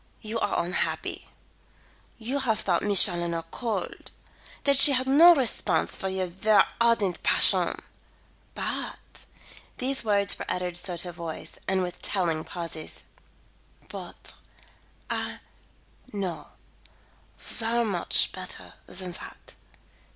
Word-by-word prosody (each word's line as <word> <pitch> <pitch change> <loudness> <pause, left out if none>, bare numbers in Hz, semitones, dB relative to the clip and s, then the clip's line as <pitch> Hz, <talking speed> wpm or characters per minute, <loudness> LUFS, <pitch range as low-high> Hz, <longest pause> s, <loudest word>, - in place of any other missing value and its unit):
"You 220 +1 -4
are 205 - 0
unhappy. 180 - -3 0.9
You 245 +5 -3
have 225 -5 0
thought 175 -3 +1
Miss 205 -2 +7
Challoner 170 -3 -2
cold; 235 -3 -4 0.5
that 280 0 +4
she 275 +1 +9
had 260 0 0
no 330 +6 +8
response 220 - 0
for 190 - -4
your 190 0 -1
ver 195 +4 +3 0.2
ardent 230 -6 +2
passion. - - +4 0.8
But - - -4 0.5
" - - -23
these 265 +1 0
words 200 -2 +1
were - - -5
uttered 180 -1 -2
sotto 175 0 -1
voce 165 -1 -7
and 190 -1 +1
with 180 -1 -6
telling 170 -5 0
pauses 165 -3 -6 0.4
" - - -33
but - - -9 0.7
I - - -4 0.7
know 190 -5 -4 0.9
ver 235 +1 -2
much 190 -5 +1
better - - -6
than 185 -1 -5
that. - - -10
195 Hz, 120 wpm, -26 LUFS, 175-230 Hz, 0.9 s, she